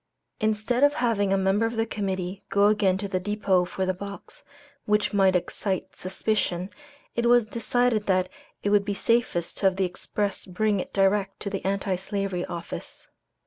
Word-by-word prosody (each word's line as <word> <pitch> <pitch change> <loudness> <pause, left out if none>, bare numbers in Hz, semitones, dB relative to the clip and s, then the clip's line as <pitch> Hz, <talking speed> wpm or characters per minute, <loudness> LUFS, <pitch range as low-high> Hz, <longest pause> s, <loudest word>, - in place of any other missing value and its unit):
Instead 220 +4 +1
of 290 0 +5
having 225 -8 +1
a 195 - +3
member 195 +4 +2
of 230 - -5
the 225 0 +1
Committee 190 -3 -3
go 200 0 +4
again 205 -3 +2
to 200 +1 -4
the 185 -1 -1
depot 195 -2 +1
for 190 +1 -2
the 185 - +1
box, 200 +2 -9 0.4
which 210 0 +1
might 190 -2 +4
excite 190 +2 -2
suspicion, 185 -1 -1 0.4
it 235 0 +1
was 240 -1 +5
decided 235 0 0
that 185 -1 +2 0.4
it 205 - +1
would 205 -1 +4
be 200 0 -2
safest 225 -7 0
to 195 - +4
have 190 - +2
the 190 0 +1
express 200 +3 -3
bring 205 +2 +1
it - - -5
direct 195 0 +1
to 200 - -4
the 195 - -3
Anti 195 -1 0
Slavery 195 -1 -2
Office. 170 - -7
200 Hz, 180 wpm, -26 LUFS, 190-215 Hz, 0.4 s, of